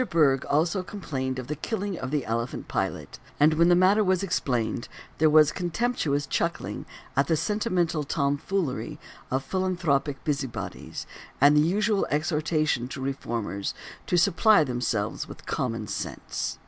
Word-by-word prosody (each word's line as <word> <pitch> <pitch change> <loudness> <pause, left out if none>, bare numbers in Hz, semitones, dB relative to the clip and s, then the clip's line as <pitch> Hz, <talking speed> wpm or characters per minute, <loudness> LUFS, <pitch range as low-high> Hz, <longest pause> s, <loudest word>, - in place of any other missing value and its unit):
Bergh 140 -5 +3
also 165 +6 +2
complained 135 -10 -4
of 130 - -4
the 150 +4 -3
killing 200 +4 -3
of 130 - -4
the 145 -1 -1
elephant 115 +2 -3
Pilate, - - -3 0.2
and 155 +2 +6
when 170 +2 +4
the 175 - +6
matter 190 +4 +5
was 185 -1 +2
explained 125 - -1 0.3
there 155 0 +5
was 155 0 +6
contemptuous 175 -6 -1
chuckling 170 +3 -2 0.3
at 140 +1 +3
the 160 - +2
sentimental 175 -3 0
tomfoolery 145 +2 -1 0.3
of 130 +1 0
philanthropic 175 -7 0
busybodies, 140 -5 -4 0.3
and 145 +2 +6
the 150 - +6
usual 205 +5 +2
exhortation 155 -3 0
to 135 - -7
reformers 115 -7 -3 0.3
to 180 - +2
supply 195 +1 +5
themselves 120 -5 -2
with - - -11
common - - -2
sense. - - -4
155 Hz, 140 wpm, -26 LUFS, 135-180 Hz, 0.3 s, and